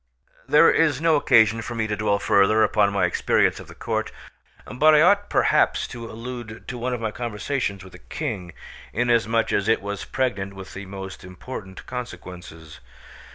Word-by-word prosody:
There 150 +3 +6
is 155 -4 +2
no 165 0 +3
occasion 115 -6 +4
for 120 +2 -6
me 110 -1 -1
to 105 -1 -2
dwell 105 0 +1
further 100 +2 +3
upon 105 -2 +2
my 100 -2 +1
experience 85 - +1
of - - -11
the - - -13
court, - - -3 0.5
but 155 +5 +4
I 150 - +6
ought 200 +3 +3
perhaps - - +2
to 115 -1 -8
allude 115 -1 -8
to 125 - -5
one 125 +2 -2
of - - -6
my 110 -1 -2
conversations 115 -2 -3
with 95 - -14
the 90 - -12
King, 100 - -5 0.4
inasmuch 115 -1 +1
as 100 0 0
it 110 - +3
was 100 0 -5
pregnant 100 -7 -2
with 95 -1 -10
the 100 +1 -8
most 95 0 -8
important 95 +1 -9
consequences. 90 - -9
110 Hz, 175 wpm, -23 LUFS, 100-125 Hz, 0.5 s, There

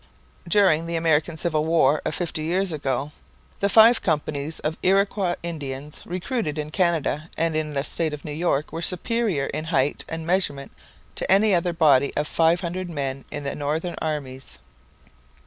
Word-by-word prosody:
During 170 -4 +3
the 170 - -2
American 160 0 +1
Civil 155 -2 0
War 155 -3 +3
of - - -1
fifty 170 -3 -2
years 180 +4 0
ago 140 -2 -2 0.5
the 200 - +1
five 225 +3 +7
companies 150 -2 -2
of 155 +1 -2
Iroquois 195 -1 +2
Indians 145 -3 -6
recruited 180 - -3
in 150 0 -4
Canada 165 -3 0
and 165 -1 0
in 155 -1 -2
the 140 - 0
state 160 +1 0
of 150 -1 -7
New 150 - -5
York 155 -1 -1
were 165 - -4
superior 185 - 0
in 155 - -4
height 145 -4 0
and 165 0 -5
measurement 165 -6 -1 0.4
to - - -2
any 200 +2 +5
other 175 0 +2
body 145 -5 +4
of 150 - 0
five 165 +2 +2
hundred 180 +1 -4
men 135 -4 -4
in 145 -1 -6
the 140 - -3
northern 155 +4 -2
armies. 130 - -4
160 Hz, 165 wpm, -24 LUFS, 145-175 Hz, 0.5 s, five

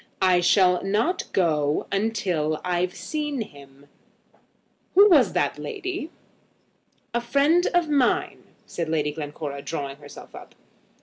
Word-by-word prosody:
"I 180 -1 +4
shall 180 0 +3
not 215 - -1
go 155 -5 +1 0.3
till 155 -7 -1
I've 180 0 -1
seen 295 -4 -3
him. 140 -7 -12 1.1
Who 400 +2 +8
was - - +5
that - - 0
lady?" 375 -6 -5 1.0
"A 240 - 0
friend 285 +8 +2
of 350 -2 +3
mine," 300 +6 0 0.2
said 170 -2 -4
Lady 150 -2 0
Glencora, 145 -2 -6
drawing 140 -3 -5
herself 145 0 -13
up. - - -12
180 Hz, 120 wpm, -24 LUFS, -, 1.1 s, Who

